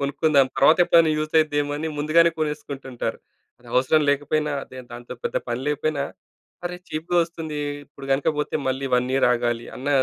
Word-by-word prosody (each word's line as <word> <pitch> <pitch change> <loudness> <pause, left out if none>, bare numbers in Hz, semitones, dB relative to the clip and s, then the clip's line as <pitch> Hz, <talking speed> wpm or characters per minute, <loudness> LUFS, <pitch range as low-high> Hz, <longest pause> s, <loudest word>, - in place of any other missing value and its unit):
కొనుక్కుందాం, 140 0 +3
తర్వాతెప్పుడైనా 165 +2 +5
యూస్ 155 +1 -3
అవుద్దేమో 145 -2 +1
అని" 160 +2 -3
ముందుగానే 165 +3 +4
కొనేసుకుంటుంటారు. 140 -4 -4 0.4
అది - - -16
అవసరం 135 +5 +4
లేకపోయినా 145 +1 0
అదేం 130 -1 -11
దాంతో 120 +1 -8
పెద్ద - - -2
పని 120 +1 -2
లేకపోయినా 150 -1 -1 0.6
"అరే 180 - -5
చీప్‌గా 165 +3 -1
ఒస్తుంది. 160 -3 -6 0.3
ఇప్పుడు 135 -1 -11
గనక 135 +3 +1
పోతే 150 - -1
మళ్ళీ 135 +1 -1
1 125 +1 -2
ఇయర్ 135 -2 +4
ఆగాలి" 120 -1 -1
అన్న 135 +3 -5
145 Hz, 155 wpm, -23 LUFS, 135-155 Hz, 0.6 s, తర్వాతెప్పుడైనా